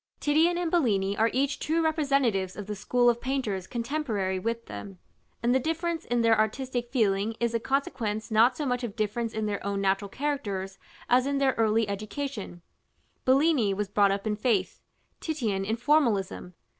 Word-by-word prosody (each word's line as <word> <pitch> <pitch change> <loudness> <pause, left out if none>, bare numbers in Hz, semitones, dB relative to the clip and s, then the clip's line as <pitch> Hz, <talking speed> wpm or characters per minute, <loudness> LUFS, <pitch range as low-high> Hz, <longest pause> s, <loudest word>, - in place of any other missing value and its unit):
Titian 320 +4 +3
and 350 -2 -1
Bellini 205 - +2
are 225 +2 +3
each 275 +2 0
true 325 +2 0
representatives 275 - +1
of 205 - -6
the 210 - -4
school 245 +4 +1
of 240 0 +3
painters 225 -9 -2
contemporary 230 -7 -2
with 230 +4 -3
them; 195 -2 -8 0.5
and 240 +1 +3
the 260 - +4
difference 330 +3 -2
in 240 0 0
their 230 -1 +5
artistic 240 +3 -1
feeling 215 -3 +1
is 235 -1 0
a 230 - +1
consequence 225 -5 -2
not 230 +4 +4
so 300 - -2
much 250 -1 -1
of 225 -4 -4
difference 225 +1 -1
in 220 0 -2
their 205 -1 -3
own 200 0 -2
natural 195 +1 0
characters 200 -8 -3 0.3
as 255 +2 +3
in 280 0 0
their 270 -1 +2
early 225 -1 +2
education: 205 -2 -5 0.6
Bellini 260 -6 +3
was 205 0 -2
brought 205 0 +4
up 200 +1 -2
in 215 -1 0
faith; 210 -4 0 0.4
Titian 230 - -2
in 220 +3 -1
formalism. 230 - +1
230 Hz, 175 wpm, -27 LUFS, 200-275 Hz, 0.6 s, their